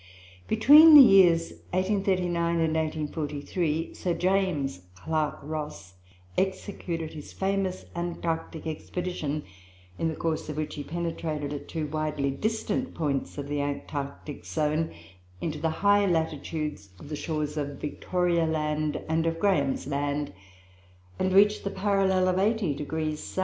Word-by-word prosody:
Between 300 +8 +8
the 290 - +13
years 175 -7 +6 0.2
1839 185 -3 +1
and 160 -1 +1
1843, 155 +1 -2
Sir 175 -2 -2
James 180 - 0 0.2
Clark 155 +6 -1
Ross 150 -10 -6 0.5
executed 185 -4 -3
his 150 -2 -9
famous 190 -1 -1
Antarctic 170 -2 -3
expedition, 160 -2 -3 0.6
in 165 - +1
the 160 - -2
course 160 -2 -2
of 150 - -5
which 155 -1 -3
he 145 - -5
penetrated, 160 -3 -3
at 145 - -6
two 160 -2 -3
widely 150 -2 -1
distant 220 - -2
points 145 -4 -2
of 140 -1 -4
the 145 0 -1
Antarctic 145 0 -5
zone, 155 +1 -1 0.5
into 155 -2 -3
the 160 +2 0
high 200 +5 +3
latitudes 155 - -2
of 145 - -12
the 150 - -3
shores 150 -1 -3
of 145 -2 -4
Victoria 170 +2 0
Land 150 -1 -1
and 160 +1 +1
of 165 0 -1
Graham's 150 -9 +1
Land, 145 -2 -2 0.9
and 185 - +1
reached 205 +2 +5
the 200 - -1
parallel 190 -2 +2
of 185 0 +2
80° 160 -7 0
S. 150 - -8
160 Hz, 135 wpm, -27 LUFS, 150-185 Hz, 0.9 s, the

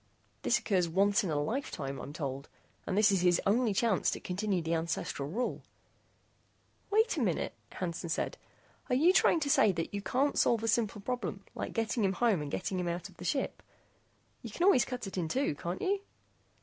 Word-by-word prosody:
This - - +3
occurs 180 -5 +1
once 200 +6 +3
in 185 - -2
a 150 -2 0
lifetime, 145 - -3
I'm 140 - -7
told, 140 -3 -5 0.4
and 190 - -1
this 210 0 +5
is 190 -2 +2
his 175 -1 +4
only 225 +3 +3
chance 210 0 +2
to - - -3
continue 190 +1 -1
the 165 0 -2
ancestral 160 -3 -2
rule 240 +9 -2 0.6
" - - -39
"Wait 440 +3 +3
a - - 0
minute," - - 0 0.2
Hansen 170 -1 -4
said. 165 - -1 0.5
"Are 250 - +3
you 330 +8 +5
trying 345 - +4
to 285 - 0
say 215 - +5
that 165 +2 -4
you 200 - -2
can't 270 +7 +1
solve 230 -2 +3
a - - 0
simple 220 -2 +1
problem 205 -4 -4
like - - -5
getting 225 0 0
him 190 -1 +2
home 215 -5 +2
and 145 - -4
getting 185 +4 -2
him 180 - -2
out 175 +3 -3
of 185 - -20
the 180 - -8
ship? 270 +7 -1 0.8
You - - -7
can 345 - -3
always 360 - +5
cut 250 -3 -5
it 195 -1 -4
in 165 - -1
two, 265 - 0
can't 170 +5 -5
you?" 395 +1 +1
195 Hz, 205 wpm, -31 LUFS, 170-240 Hz, 0.8 s, this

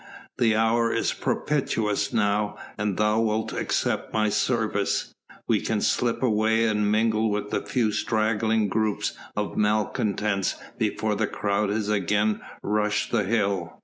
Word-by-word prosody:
The 115 -3 +3
hour 115 +1 +2
is - - 0
propitious 120 -6 -1
now, 105 -2 0 0.2
an 105 -2 -1
thou 105 +2 +2
wilt 110 -1 0
accept - - -1
my 110 -1 +1
service, 110 -3 0 0.3
we - - +2
can - - -1
slip 120 +1 0
away 110 -1 +2
and 105 -2 +1
mingle 110 0 +2
with 105 0 -2
the - - 0
few 115 -4 0
straggling 110 0 +1
groups 110 +1 0 0.2
of 105 -1 -3
malcontents 105 -1 0 0.2
before - - 0
the - - 0
crowd 100 0 -1
has 105 0 -1
again 105 +1 +1 0.2
rushed 105 0 0
the 110 -4 +1
hill. 100 -5 -1
105 Hz, 140 wpm, -25 LUFS, 105-110 Hz, 0.3 s, The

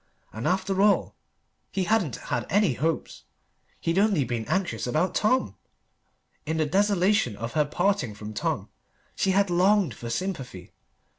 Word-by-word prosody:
And 110 +2 -3
after 190 +1 +1
all 205 0 +3 0.6
he 190 - -1
hadn't 185 - +1
had - - -3
any 205 -7 +3
hopes: 160 +6 -3 0.5
he'd 165 +3 0
only 200 -8 +3
been 120 -2 -3
anxious 175 - -1
about 155 +9 0
Tom! 215 - +1 0.9
In 160 +1 -2
the 155 - +2
desolation 195 - +2
of 115 +3 -5
her 150 -1 +2
parting 150 - 0
from 105 +1 -8
Tom - - -2 0.5
she 195 - 0
had 195 0 +2
longed 190 +2 +3
for 120 - -7
sympathy. 125 - -4
175 Hz, 145 wpm, -26 LUFS, 125-195 Hz, 0.9 s, all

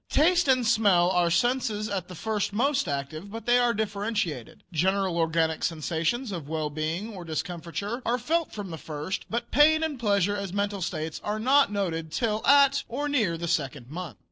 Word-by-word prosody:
Taste 345 +1 +3
and 255 -2 +3
smell 200 -6 +4
are 175 -2 +2
senses 220 +2 +1
at 195 -4 -3
the 180 - -9
first 210 +2 -2
most 270 +2 +1
active, 145 +6 -4
but 225 +2 -8
they 245 0 +4
are 245 -1 +3
differentiated. 205 - -3
General 190 +2 +1
organic 165 -1 +1
sensations 165 - -1
of 165 -6 -6
well 155 -2 -2
being 160 +9 -3
or 185 -3 -8
discomfiture 175 +7 -4
are 240 +2 +1
felt 320 +7 -1
from 200 -4 -6
the 160 - -6
first, 155 +4 -5
but 235 +1 -3
pain 315 +3 +5
and 300 -5 -2
pleasure 205 -3 +2
as 200 -3 -4
mental 200 -1 -1
states 160 -2 -4
are 210 +1 -2
not 265 +3 +4
noted 165 -6 -2
till 220 +1 -1
at 280 0 +5
or 285 +5 -2
near 220 -13 +1
the 170 +1 -4
second 140 -6 -2
month. 165 - -6
200 Hz, 185 wpm, -27 LUFS, 165-240 Hz, -, pain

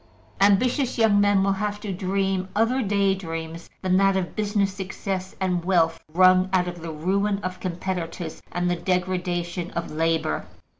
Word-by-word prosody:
Ambitious 245 +7 +3
young 215 -3 +4
men 205 -1 +4
will 195 - +2
have 205 +1 -2
to 205 -2 -4
dream 190 0 -1
other 230 +5 +2
daydreams 190 -6 -1
than 185 0 +3
that 195 0 +4
of 180 -2 -3
business 205 -2 0
success 190 -1 -4
and 180 -2 0
wealth 170 -3 +2
wrung 185 +2 +5
out 180 -1 +3
of 175 -1 -6
the 165 - -6
ruin 195 +6 0
of 185 0 -4
competitors 175 -2 -4
and 175 0 -1
the 175 - +1
degradation 180 -1 -2
of 170 - -3
labor. 160 - 0
185 Hz, 155 wpm, -24 LUFS, 175-200 Hz, -, wrung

